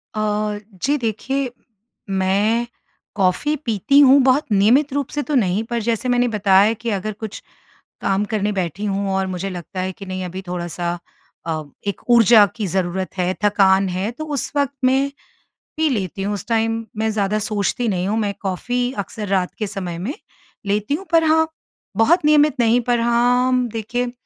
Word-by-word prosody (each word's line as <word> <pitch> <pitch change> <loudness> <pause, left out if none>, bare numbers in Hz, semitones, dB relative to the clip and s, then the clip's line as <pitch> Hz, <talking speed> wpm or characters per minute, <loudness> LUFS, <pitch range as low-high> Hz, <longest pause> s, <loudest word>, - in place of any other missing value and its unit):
अ, 210 -1 -1 0.2
जी 290 +2 +2
देखिए, 250 +3 -2 0.6
मैं 200 +5 +1 0.5
कॉफ़ी 200 +10 +1
पीती 230 +6 +3
हूँ 280 0 +7
बहुत 265 +3 +3
नियमित 230 +9 +4
रूप 285 -2 -1
से 295 - -2
तो 300 - -2
नहीं 205 -3 +2
पर 235 -1 -1
जैसे 230 +2 -1
मैंने 245 0 +3
बताया 205 -1 +4
कि 235 - -2
अगर 215 0 -2
कुछ 220 -2 -6 0.6
काम 195 +1 +1
करने 210 -1 0
बैठी 190 0 -3
हूँ 200 -1 -1
और 190 0 0
मुझे 185 +1 -4
लगता 185 +1 -7
है 185 +1 -2
कि 195 +2 -11
नहीं 185 0 -4
अभी 185 +2 -6
थोड़ा-सा 175 0 -3 0.5
अ, 160 -1 -2 0.2
एक 200 - -3
ऊर्जा 230 -2 +7
की 215 -4 -3
ज़रूरत 185 +1 -2
है 180 0 0
थकान 195 -1 +4
है, 185 +3 -2
तो 310 +6 -7
उस 290 -4 -3
वक़्त 280 -1 +1
मैं 265 +2 +3 0.7
पी 315 0 +2
लेती 195 - -2
हूँ। 205 +1 -1
उस 200 - -5
टाइम 225 0 0
मैं 220 +1 0
ज़्यादा 210 0 0
सोचती 215 +3 -1
नहीं 185 -3 -1
हूँ। 215 +2 0
मैं 205 -2 -1
कॉफी 245 +6 -1
अक्सर 210 +2 -7
रात 185 -2 0
के 215 - -1
समय 180 -4 -5
में 200 +11 -3 0.5
लेती 210 +5 0
हूँ 360 +7 -3
पर 330 -1 +5
हाँ, 320 0 +3 0.5
बहुत 305 +9 +4
नियमित 300 -2 +4
नहीं 235 +1 +3
पर 240 -1 +2
हाँ, 245 +2 +2
देखिए 240 +2 -2
215 Hz, 175 wpm, -20 LUFS, 195-245 Hz, 0.7 s, हूँ